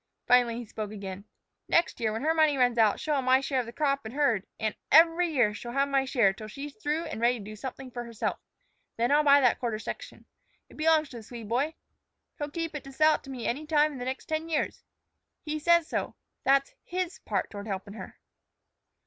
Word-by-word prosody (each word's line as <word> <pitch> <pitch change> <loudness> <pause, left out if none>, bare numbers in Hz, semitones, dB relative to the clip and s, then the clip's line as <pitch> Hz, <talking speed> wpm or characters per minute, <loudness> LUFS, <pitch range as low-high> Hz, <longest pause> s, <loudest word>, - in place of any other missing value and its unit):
Finally 245 -2 +4
he 240 - -6
spoke 215 -1 -5
again. 200 -1 -7 0.4
"Next 335 -5 +2
year, 220 -2 0
when 225 +4 -4
her 320 +1 +3
money 310 -3 +3
runs 245 -2 +3
out, 215 -2 +4
she'll 305 - -1
have 275 -2 +1
my 255 +1 +5
share 270 -1 -1
of 245 - -3
the - - -6
crop 275 0 0
and 220 +4 -8
herd; 235 -9 +1
an' 215 -1 -1 0.2
every 330 +2 +6
year 245 -9 +2
she'll 240 +3 -7
have 275 +1 +1
my 270 -1 +2
share 235 -7 +3
till 215 +2 -9
she's 275 +6 -7
through 300 +8 -2
an' 315 - -6
ready 240 +1 +3
to 215 - -9
do 215 +1 -8
something 260 +3 -7
for 240 0 -5
herself. 230 -2 -3 0.6
Then 235 +3 +1
I'll 295 +1 +5
buy 285 -1 +6
that 250 -3 +3
quarter 235 -4 -2
section. - - -8 0.4
It - - -16
belongs 310 -1 +3
to 245 - -9
the - - -8
Swede 230 -1 -9
boy. 280 +7 0 0.6
He'll 290 0 -3
keep 330 +1 -4
it 295 - -5
to 275 - -9
sell 310 +3 +4
it - - -3
to - - -11
me 255 -3 -6
any 295 +6 -2
time 305 -1 +3
in 275 - -8
the 245 - -4
next 260 +1 -4
ten 315 +1 -3
years. 315 - -1 0.6
He 310 0 -3
says 340 +1 +4
so; - - -3 0.3
that's 275 0 +3
his 365 0 -4
part - - -2
toward 205 0 -7
helpin' 195 0 -5
her." - - -9
265 Hz, 230 wpm, -28 LUFS, 230-300 Hz, 0.6 s, every